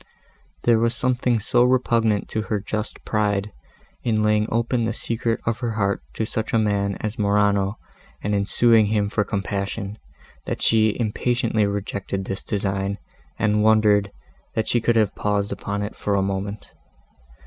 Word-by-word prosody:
There 115 -2 +4
was 115 +1 +1
something 125 -2 +1
so 120 +3 +3
repugnant 115 -4 +2
to 110 - -1
her 105 -3 +1
just 105 +2 -5
pride, 105 -1 0 0.5
in 110 -3 +1
laying 105 0 +2
open 115 +1 +1
the 115 - -1
secret 115 0 -2
of 115 0 -1
her 120 -2 -2
heart 100 -2 0
to 110 - -1
such 110 0 -3
a - - +4
man 100 -2 +1
as 110 +3 -4
Morano, 100 0 +2 0.5
and 105 - 0
in 100 -1 0
suing 115 -3 +4
to - - -3
him 105 -2 +1
for 105 0 +1
compassion, 100 +1 -3 0.5
that - - -2
she 110 -1 +3
impatiently 115 -1 +1
rejected 100 -1 -3
this 95 - -4
design 100 -1 -2 0.4
and 105 -1 +2
wondered, 105 -2 +4 0.4
that 110 - 0
she 120 - +2
could 120 +1 +2
have 110 -3 +3
paused 105 -1 -1
upon 100 0 -3
it 105 - -5
for 100 - -1
a 100 - +2
moment. 100 +1 -4
105 Hz, 165 wpm, -23 LUFS, 100-115 Hz, 0.5 s, There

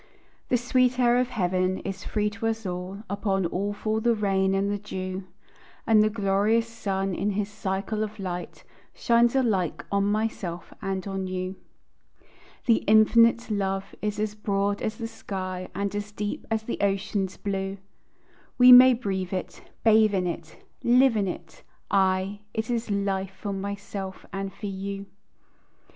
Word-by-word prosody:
The 250 - +4
sweet 250 +1 +2
air 245 0 +4
of 250 0 0
heaven 185 -4 0
is 195 0 -5
free 210 -1 -1
to 225 +1 -3
us 225 -1 -2
all; 185 +3 -5
Upon 195 -1 0
all 195 +4 -1
fall 215 +1 -2
the 235 0 +3
rain 195 -2 +1
and 200 +1 +1
the 205 - -2
dew; 185 -2 -5 0.6
And 220 -1 +5
the 215 - +4
glorious 210 +2 +1
sun 195 -4 -2
in 200 +3 -1
his 205 0 -1
cycle 205 +1 -3
of 215 0 -6
light 180 -3 -5 0.3
Shines 235 +1 +3
alike 210 -10 +1
on 200 0 +2
myself 205 -5 -2
and 195 -1 -3
on 195 -1 -3
you. 185 0 -3 1.1
The 230 -2 +5
infinite 230 +2 +5
love 195 -1 -2
is 210 -1 -2
as 210 0 -1
broad 200 -1 -1
as 215 - -2
the 230 - -4
sky, 185 -4 -5
And 200 0 -2
as 205 0 -4
deep 210 0 -4
as 220 -1 0
the 235 - -4
ocean's 195 -1 -1
blue, 195 -1 -3 0.8
We 250 0 +9
may 250 0 +10
breathe 190 -6 -3
it, 185 - -4 0.2
bathe 220 -2 +5
in 185 -1 +1
it, 165 -2 -6 0.2
live 250 0 +5
in 205 -2 +1
it, 175 -2 -7 0.3
aye, 190 +1 +2 0.2
It 220 +2 -2
is 235 -1 -2
life 195 -1 -1
for 200 -2 -3
myself 195 -1 -5
and 195 0 -3
for 210 - -9
you. 195 0 -4
200 Hz, 160 wpm, -26 LUFS, 190-220 Hz, 1.1 s, may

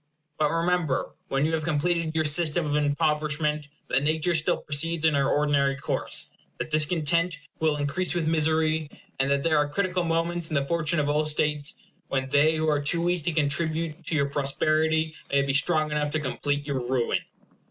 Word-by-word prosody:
But 150 -1 +3
remember, 165 -3 0 0.2
when 135 +2 0
you 160 - -1
have 160 -1 -1
completed 165 +1 0
your 160 -1 +1
system 155 +2 +2
of 145 -1 -1
impoverishment, 150 0 0 0.2
that 135 - +1
nature 155 +4 +1
still 155 -2 +2
proceeds 160 +2 -1
in 160 - +4
her 140 -1 +2
ordinary 145 -2 +2
course; 140 - -2 0.3
that - - -5
discontent 160 +2 +1 0.2
will 155 -2 +2
increase 150 +6 0
with 165 -3 0
misery; 160 -1 +1 0.3
and 135 +1 +1
that 140 0 +1
there 165 -1 +2
are 145 0 +1
critical 180 +3 -1
moments 165 0 -1
in 155 - -3
the 140 -1 +1
fortune 165 +1 0
of 145 - 0
all 150 +1 +1
states 150 +2 -1 0.3
when 130 0 -2
they 150 +3 +4
who 160 0 -1
are 150 -2 +2
too 170 +4 0
weak 175 -2 0
to 175 - +2
contribute 160 +2 -1
to 165 - -1
your 140 -2 +2
prosperity 155 +3 0 0.2
may 140 0 +3
be 140 0 -1
strong 155 +1 +2
enough 150 0 0
to 155 - +1
complete 145 0 -2
your 140 -3 -2
ruin. 125 -1 0
155 Hz, 185 wpm, -26 LUFS, 145-165 Hz, 0.3 s, in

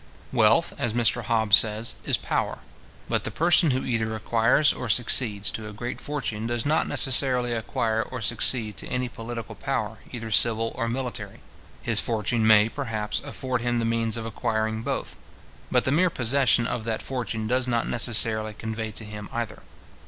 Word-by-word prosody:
Wealth, - - +3
as 120 -3 -1
Mr 120 -1 +1
Hobbes 110 -2 +4
says, 110 +1 +2
is - - +2
power. - - -2 0.5
But - - 0
the - - -2
person 170 0 +4
who 130 0 -1
either 110 -3 -1
acquires, 115 +6 +3
or 125 - -6
succeeds 110 -3 +2
to 110 -1 -6
a - - -10
great 120 +4 -6
fortune, 115 -7 -4
does 120 +1 -2
not 155 +2 +1
necessarily 125 -2 +2
acquire 110 0 -1
or 125 +3 -6
succeed 110 -1 +1
to - - -4
any 125 0 -2
political 115 -1 -7
power, 110 -2 -3
either 115 -3 -6
civil 115 +1 +3
or 115 -2 -2
military. 120 -4 -4 0.4
His - - +2
fortune 110 0 0
may, 105 -1 +6
perhaps, 110 -5 -3
afford 130 -3 -3
him 120 0 0
the 115 - 0
means 115 0 0
of 115 - -5
acquiring 110 -1 -2
both; - - -4 0.5
but - - +2
the 130 - 0
mere 180 +5 +3
possession 125 -3 +2
of 120 -1 -3
that 115 -1 -2
fortune 120 -4 -4
does 125 +3 0
not 120 -2 0
necessarily 110 -2 +2
convey 110 0 -4
to 110 - -4
him 105 -1 -8
either. 115 -2 -4
115 Hz, 175 wpm, -25 LUFS, 110-125 Hz, 0.5 s, may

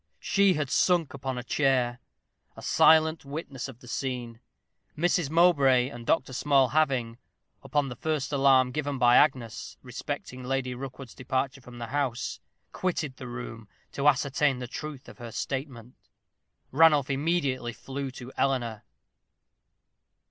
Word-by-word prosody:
She 195 -1 +3
had 150 -3 -2
sunk 170 -7 +2
upon 130 -2 -4
a 125 - -4
chair, 125 -3 +1 0.6
a - - -10
silent 160 0 +4
witness 140 -2 -6
of 125 -3 -12
the 125 - -14
scene, 120 -3 -4 0.6
Mrs. 175 -2 +1
Mowbray 140 -7 +4
and 120 -2 -10
Dr. 130 -4 +1
Small 135 0 +3
having, 130 -6 0 0.4
upon 145 -2 0
the 125 - -6
first 150 +1 -2
alarm 135 -2 +4
given 145 0 -2
by 120 -1 +5
Agnes 130 -6 +1
respecting 125 0 -6
Lady 130 0 -1
Rookwood's 130 -1 -8
departure 130 +1 -2
from 125 -1 -12
the 120 - -5
house 130 -1 -2 0.3
quitted 155 -7 -2
the 125 - -8
room 120 -3 -7 0.2
to 140 +1 0
ascertain 140 0 +2
the 125 - -5
truth 145 +2 -7
of - - -13
her 120 -1 -7
statement. 130 -2 -5 0.8
Ranulph 150 -2 +5
immediately 135 -4 0
flew 135 +3 -6
to 125 0 -10
Eleanor. 120 -5 0
135 Hz, 140 wpm, -28 LUFS, 125-145 Hz, 0.8 s, by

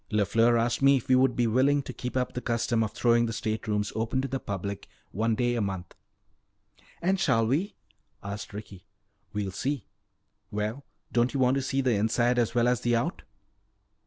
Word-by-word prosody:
LeFleur 115 +3 +3
asked 115 +2 0
me 140 0 +6
if 125 - -6
we 130 - +6
would 130 -1 +3
be 120 - +2
willing 135 +5 +3
to - - -7
keep 125 +1 -4
up 125 -1 -1
the 125 - -4
custom 115 -1 0
of 105 - -3
throwing 120 +1 +3
the - - -3
state 110 +1 -3
rooms 105 -1 0
open 115 +4 -1
to 135 - -1
the 135 +1 -3
public 100 -1 -5 0.2
one 110 +3 0
day 120 +1 +1
a 120 - 0
month." 95 -3 -4 1.1
"And 190 +2 +2
shall 115 -8 +3
we?" 155 - 0 0.5
asked 100 +1 -6
Ricky. 100 -3 -9 0.5
"We'll 100 -2 -3
see. 130 +4 -3 0.6
Well, 105 +6 -3 0.3
don't 120 +3 +1
you - - 0
want 130 0 +4
to - - 0
see 135 +1 0
the 130 -2 +2
inside 120 +4 +2
as 120 0 0
well 120 0 +3
as 125 -2 +1
the 120 0 +2
out?" 115 - -1
120 Hz, 195 wpm, -28 LUFS, 105-130 Hz, 1.1 s, me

